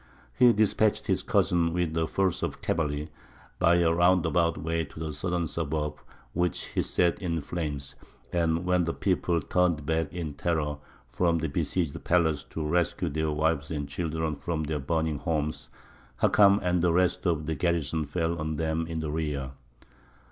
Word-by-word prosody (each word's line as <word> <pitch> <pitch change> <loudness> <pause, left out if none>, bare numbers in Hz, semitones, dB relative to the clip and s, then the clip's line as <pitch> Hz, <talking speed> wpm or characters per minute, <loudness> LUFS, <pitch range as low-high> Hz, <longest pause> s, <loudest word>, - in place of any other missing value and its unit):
He 125 - +6
despatched 110 -1 +2
his - - +1
cousin 85 -2 +2
with 85 -2 -1
a 80 -1 +1
force 95 0 0
of - - -3
cavalry, 75 -2 -2 0.5
by 85 +1 +5
a 85 -1 +3
roundabout 85 -1 +3
way, 80 +2 -1
to 75 0 -11
the 80 -1 -4
southern 85 +3 -1
suburb, 75 -1 -3 0.3
which 85 -1 0
he - - 0
set 85 -1 +1
in 85 -3 -1
flames, 75 -3 -4 0.4
and 85 0 +1
when 90 -1 +2
the 85 - -2
people 90 -3 +1
turned 85 -1 +1
back 80 -1 0
in 85 -3 -4
terror 75 -1 -1 0.3
from 85 -2 +2
the 80 0 -1
besieged 80 +1 -2
palace 80 -4 +2
to 75 -2 -4
rescue 85 +1 0
their 80 0 -1
wives 75 -1 0
and 75 -3 -3
children 80 0 -2
from 80 -2 -2
their 75 0 -2
burning 80 +1 -1
homes, 75 -2 -2 0.5
Hakam 100 -1 +5
and 90 -1 +1
the 90 0 +3
rest 90 +1 +2
of 80 -3 0
the 80 - -1
garrison 80 -1 0
fell 85 +3 -1
on 80 0 -2
them 80 +1 -1
in 80 -1 -3
the 75 -1 -3
rear. 75 -4 -2
80 Hz, 170 wpm, -28 LUFS, 75-85 Hz, 0.5 s, He